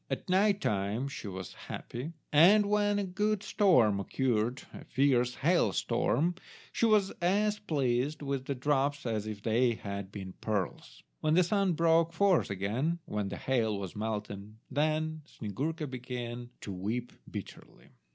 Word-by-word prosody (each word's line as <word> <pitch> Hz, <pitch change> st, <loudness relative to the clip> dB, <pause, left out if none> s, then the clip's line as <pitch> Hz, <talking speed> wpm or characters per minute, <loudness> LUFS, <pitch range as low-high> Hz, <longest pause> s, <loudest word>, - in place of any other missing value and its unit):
At -, -, -3 dB
night 200 Hz, +2 st, +3 dB
time 105 Hz, -, 0 dB
she 140 Hz, -6 st, -7 dB
was 95 Hz, -1 st, -6 dB
happy; 135 Hz, +8 st, -7 dB, 0.2 s
and 195 Hz, +8 st, +7 dB
when 205 Hz, 0 st, +2 dB
a 205 Hz, -, 0 dB
good 205 Hz, +2 st, -1 dB
storm 125 Hz, -, +4 dB
occurred, 120 Hz, +2 st, 0 dB
a -, -, -9 dB
fierce 125 Hz, -3 st, +2 dB
hail 160 Hz, -, +2 dB
storm, 160 Hz, -, +1 dB, 0.4 s
she 230 Hz, -, +2 dB
was 210 Hz, -3 st, +3 dB
as 205 Hz, +4 st, +2 dB
pleased 145 Hz, -4 st, 0 dB
with 135 Hz, -2 st, -2 dB
the 140 Hz, -, -2 dB
drops 140 Hz, +1 st, 0 dB
as 110 Hz, -2 st, -2 dB
if 105 Hz, -2 st, -6 dB
they 120 Hz, +2 st, +3 dB
had 100 Hz, -2 st, -6 dB
been 95 Hz, -3 st, -7 dB
pearls. 105 Hz, -4 st, -3 dB, 0.2 s
When 155 Hz, 0 st, +2 dB
the 180 Hz, -, +6 dB
sun 195 Hz, 0 st, +1 dB
broke 165 Hz, 0 st, +3 dB
forth 190 Hz, 0 st, +3 dB
again—when 105 Hz, -, -2 dB
the -, -, -5 dB
hail 115 Hz, -5 st, 0 dB
was 95 Hz, -3 st, -6 dB
melted—then 110 Hz, +9 st, -2 dB
Snyegurka 150 Hz, -, -4 dB
began 125 Hz, -2 st, -6 dB
to 100 Hz, -, -6 dB
weep 110 Hz, +7 st, -3 dB, 0.2 s
bitterly. -, -, -9 dB
135 Hz, 145 wpm, -31 LUFS, 110-170 Hz, 0.4 s, and